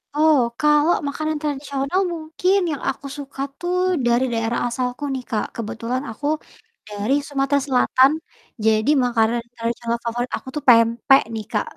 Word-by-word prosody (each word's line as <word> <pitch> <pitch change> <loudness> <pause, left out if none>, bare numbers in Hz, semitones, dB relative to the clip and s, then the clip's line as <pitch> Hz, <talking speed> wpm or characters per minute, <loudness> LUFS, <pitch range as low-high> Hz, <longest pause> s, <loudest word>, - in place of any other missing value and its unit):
Oh, 305 -2 +5 0.2
kalau 300 +2 +4
makanan 310 +2 -2
tradisional? 280 +2 -2
Mungkin, 330 +4 0
yang 285 - -4
aku 270 - -5
suka 275 -1 -7 0.2
tuh 350 +1 -3 0.3
dari 240 +2 +3
daerah 225 +1 -1
asalku 250 +3 -3
nih 255 -1 -4
Kak, 215 -2 -1
kebetulan 230 +3 -3
aku 255 +6 -8 0.6
dari 210 +5 -2
Sumatera 280 0 +1
Selatan. 260 +1 +4 0.5
Jadi, 220 +3 +3 0.2
makanan 235 -1 +1
tradisional 235 0 -2
favorit 240 +2 -2
aku - - -15
tuh 300 - -3
pempek 235 +3 +5
nih, 220 -1 -4
Kak. 210 - +1
260 Hz, 145 wpm, -21 LUFS, 230-290 Hz, 0.6 s, Oh